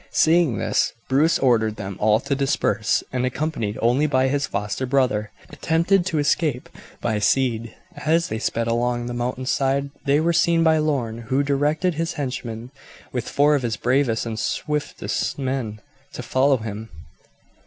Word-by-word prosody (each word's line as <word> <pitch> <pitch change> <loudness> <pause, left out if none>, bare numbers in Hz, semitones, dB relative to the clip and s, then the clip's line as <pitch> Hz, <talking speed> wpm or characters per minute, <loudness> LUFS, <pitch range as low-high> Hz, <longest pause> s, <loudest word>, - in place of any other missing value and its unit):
Seeing 160 - +3
this, - - 0 0.2
Bruce 150 +5 +3
ordered 110 -5 +2
them 100 -3 -6
all 105 +1 +3
to - - -2
disperse, 135 -6 +1
and, 125 -1 0
accompanied 130 -5 -2
only 125 +6 +3
by 130 -2 +2
his 140 +1 0
foster 105 +6 -3
brother, 125 -6 +1 0.2
attempted 175 +3 +1
to 165 - -1
escape 145 -2 0 0.3
by 105 - 0
speed. 115 0 0 0.2
As 165 +2 +1
they 110 - -3
sped 115 0 -1
along 120 +1 0
the 120 - -4
mountain 125 +1 -3
side 140 +1 0
they 140 +1 +3
were 170 +2 +2
seen 165 0 +3
by 160 -1 +4
Lorne, 130 -7 -1
who 135 +2 +2
directed 145 +5 +1
his 165 +1 -2
henchman, 125 -3 -5 0.4
with 125 -3 -3
four 145 +1 +3
of 145 - +2
his 115 -3 -2
bravest 125 -2 +1
and 110 -1 -4
swiftest 150 +6 -2
men, 130 -6 -3 0.3
to - - -6
follow 135 +1 +2
him. 110 0 -6
130 Hz, 160 wpm, -22 LUFS, 115-150 Hz, 0.4 s, by